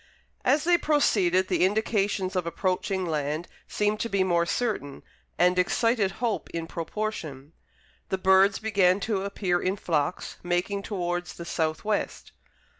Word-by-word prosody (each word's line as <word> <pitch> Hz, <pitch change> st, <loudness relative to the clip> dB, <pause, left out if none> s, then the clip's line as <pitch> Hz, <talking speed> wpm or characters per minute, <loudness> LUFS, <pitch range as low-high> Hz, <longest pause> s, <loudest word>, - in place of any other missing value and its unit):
As 290 Hz, +4 st, +3 dB
they 345 Hz, 0 st, +4 dB
proceeded, 190 Hz, -, +2 dB
the -, -, +1 dB
indications 200 Hz, -1 st, 0 dB
of 180 Hz, -2 st, -1 dB
approaching 185 Hz, +2 st, -1 dB
land 155 Hz, +1 st, -2 dB, 0.2 s
seemed 210 Hz, 0 st, 0 dB
to 230 Hz, -, -2 dB
be 200 Hz, -2 st, +2 dB
more 170 Hz, -2 st, +1 dB
certain, 205 Hz, -, -2 dB, 0.3 s
and 180 Hz, +1 st, +3 dB
excited 210 Hz, +1 st, +2 dB
hope 235 Hz, 0 st, -2 dB
in 165 Hz, -1 st, -4 dB
proportion. 165 Hz, -5 st, -5 dB, 0.6 s
The 190 Hz, -, 0 dB
birds 190 Hz, +1 st, +4 dB
began 200 Hz, -4 st, +2 dB
to 205 Hz, -2 st, -1 dB
appear 190 Hz, -3 st, -1 dB
in 185 Hz, +1 st, 0 dB
flocks, 160 Hz, -4 st, -2 dB
making 175 Hz, +3 st, -1 dB
towards 175 Hz, -3 st, -3 dB
the 170 Hz, -, -8 dB
south 160 Hz, 0 st, -2 dB
west. 210 Hz, -1 st, -2 dB
190 Hz, 140 wpm, -27 LUFS, 175-210 Hz, 0.6 s, they